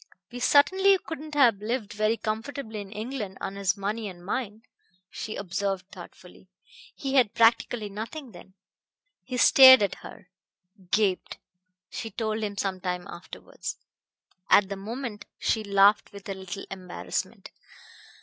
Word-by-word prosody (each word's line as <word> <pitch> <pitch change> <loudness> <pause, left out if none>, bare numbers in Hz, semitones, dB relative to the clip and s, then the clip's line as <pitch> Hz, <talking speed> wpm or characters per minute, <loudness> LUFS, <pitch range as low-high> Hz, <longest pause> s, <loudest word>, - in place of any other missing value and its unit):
"We 245 - -7
certainly 380 +10 +5
couldn't 310 -3 -8
have 245 -7 +5
lived 215 -1 -3
very 215 +2 +1
comfortably 220 0 -4
in 200 -1 -11
England 215 -2 -5
on 195 - -5
his 195 -1 0
money 210 +2 -3
and 175 -1 -13
mine," 215 +1 -4 0.5
she 220 - -6
observed 195 0 -3
thoughtfully. - - -14 0.5
"He 270 -1 -4
had 250 -6 +3
practically 230 -1 +3
nothing 230 +7 -7
then." 185 0 -15 0.7
He 255 -1 -5
stared 260 -1 +9
at 200 - 0
her - - -12 0.6
"gaped," 195 -3 0 0.5
she 225 - -5
told 220 +1 -3
him 205 -2 -4
some 190 -2 -2
time 180 -1 -3
afterwards. 175 - -8 0.7
At 200 -1 +5
the 200 - -3
moment 220 +2 -6
she 220 - 0
laughed 200 +1 +4
with 200 -1 -11
a 195 - -3
little 190 +1 -7
embarrassment. 185 -2 -5
215 Hz, 140 wpm, -26 LUFS, 195-245 Hz, 0.7 s, stared